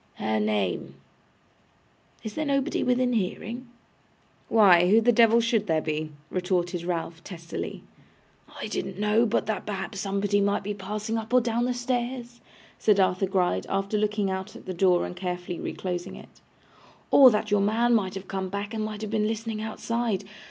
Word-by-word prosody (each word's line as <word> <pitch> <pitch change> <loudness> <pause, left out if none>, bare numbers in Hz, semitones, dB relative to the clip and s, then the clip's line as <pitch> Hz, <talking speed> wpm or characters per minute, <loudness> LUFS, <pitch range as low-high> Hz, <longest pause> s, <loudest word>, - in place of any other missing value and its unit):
Her 110 0 -1
name 100 -9 -1 1.3
is 220 - -5
there 310 - -2
nobody 280 0 0
within 250 0 +2
hearing?' 230 +4 -3 0.8
'Why, 180 -5 +6
who 215 +3 +6
the 235 +2 +4
devil 230 0 +5
should 230 -2 +1
there 160 -2 +2
be?' 155 0 -3 0.2
retorted 180 -1 -1
Ralph, 170 -1 -4
testily. 170 -3 -6 0.8
'I - - -4
didn't 185 - -4
know 210 +3 +3
but 220 0 0
that 220 0 -2
perhaps 195 -1 -4
somebody 200 +1 0
might 200 +1 +1
be 205 +1 -3
passing 210 +3 -3
up 220 +1 -8
or - - +8
down 235 0 0
the 250 - 0
stairs,' 245 0 -3 0.4
said 210 -2 +3
Arthur 185 0 +2
Gride, 180 - 0
after 195 +2 -1
looking 210 -2 0
out 190 +2 -5
at - - -12
the 185 - -4
door 180 0 +3
and - - -7
carefully 180 -1 -4
reclosing 180 -2 -4
it; - - -15 0.7
'or 270 -2 +9
but - - 0
that 210 0 -5
your 205 -1 +4
man 230 +4 +2
might 195 -5 +1
have 195 0 -7
come 190 -1 -3
back 200 +3 -4
and 220 -1 -2
might 215 0 -5
have 215 - -4
been 215 -1 +1
listening 225 0 -3
outside. 220 -1 -2
205 Hz, 175 wpm, -26 LUFS, 185-225 Hz, 1.3 s, or